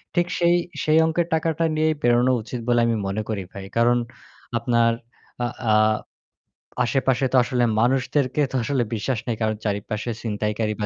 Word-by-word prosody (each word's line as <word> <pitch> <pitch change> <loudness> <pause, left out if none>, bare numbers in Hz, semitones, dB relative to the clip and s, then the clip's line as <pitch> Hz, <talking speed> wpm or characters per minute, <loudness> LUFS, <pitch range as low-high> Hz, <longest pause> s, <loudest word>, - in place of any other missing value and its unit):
ঠিক 175 0 +3
সেই 175 0 +4 0.3
সেই 155 +1 +3
অঙ্কের 165 +1 0
টাকাটা 160 0 0
নিয়েই 155 0 +2
বেরোনো 120 +1 +4
উচিত 120 +2 -6
বলে 120 -1 +3
আমি 115 - +1
মনে 100 +3 -2
করি 105 -3 -2
ভাই। 100 -1 -8
কারণ 120 +1 +4 0.6
আপনার 115 0 +2 0.5
আ - - +1 0.3
আ - - +5 1.1
আশেপাশে 130 +1 +1
তো - - +3
আসলে 125 0 0 0.2
মানুষদেরকে 130 +3 +1
তো - - -4
আসলে 130 -1 0
বিশ্বাস 110 +2 -2
নেই 115 - 0
কারণ 110 0 +1
চারিপাশে 105 +2 -2
চিনতাইকারী 105 0 -1
বা - - 0
120 Hz, 160 wpm, -23 LUFS, 110-140 Hz, 1.1 s, আ